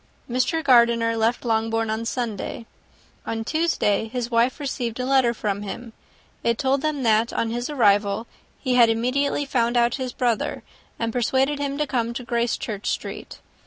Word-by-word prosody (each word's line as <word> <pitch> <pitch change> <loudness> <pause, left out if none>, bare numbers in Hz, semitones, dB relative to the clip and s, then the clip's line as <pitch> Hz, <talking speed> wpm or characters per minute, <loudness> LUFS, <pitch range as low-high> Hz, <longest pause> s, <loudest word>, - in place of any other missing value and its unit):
Mr. 255 +6 0
Gardiner 235 -3 +4
left 225 +3 0
Longbourn 225 -1 0
on 220 +1 -2
Sunday; 230 -1 -4 0.6
on 225 0 -3
Tuesday, 305 -9 +1
his 240 +1 -4
wife 235 +4 +2
received 250 -4 -3
a 250 - -1
letter 260 -2 +3
from 205 -3 -3
him: 225 +3 -7 0.5
it 235 -1 +1
told 270 0 +1
them, 300 -3 -1
that 225 0 +3
on 225 - -1
his 240 +3 -3
arrival 205 -5 +2 0.3
he 260 -3 -1
had 240 -2 +6
immediately 255 +6 0
found 240 -3 +1
out 235 +1 +2
his 255 -1 -2
brother, 240 -3 -1 0.3
and 230 -1 -2
persuaded 265 +4 +1
him 280 -1 -2
to 300 - +1
come 235 -4 -2
to 250 - -4
Gracechurch 235 -3 -2
Street. - - -5
235 Hz, 165 wpm, -23 LUFS, 225-260 Hz, 0.6 s, had